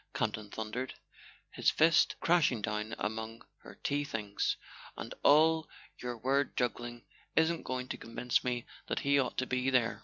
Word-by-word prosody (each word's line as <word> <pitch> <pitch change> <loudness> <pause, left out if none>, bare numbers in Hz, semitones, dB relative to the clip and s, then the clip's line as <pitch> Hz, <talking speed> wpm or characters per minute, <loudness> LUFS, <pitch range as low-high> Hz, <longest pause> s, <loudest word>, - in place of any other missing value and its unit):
Campton 105 -1 -1
thundered, 110 +5 -4 0.6
his - - +2
fist 160 0 +4
crashing 165 -8 +3
down 105 0 -2
among 110 +1 -4
her - - -13
tea 145 +1 +1
things; 105 -7 -1 0.4
"and - - -6
all 160 +2 +5 0.3
your 125 -1 -4
word 135 +4 0
juggling 120 -1 -2 0.3
isn't 160 +1 +3
going 130 0 -3
to - - -3
convince 120 +2 0
me 125 -1 -1 0.2
that - - -1
he 140 0 +3
ought 130 - -1
to 130 - +1
be 130 +1 0
there." 125 -3 +2
125 Hz, 155 wpm, -32 LUFS, 115-140 Hz, 0.6 s, all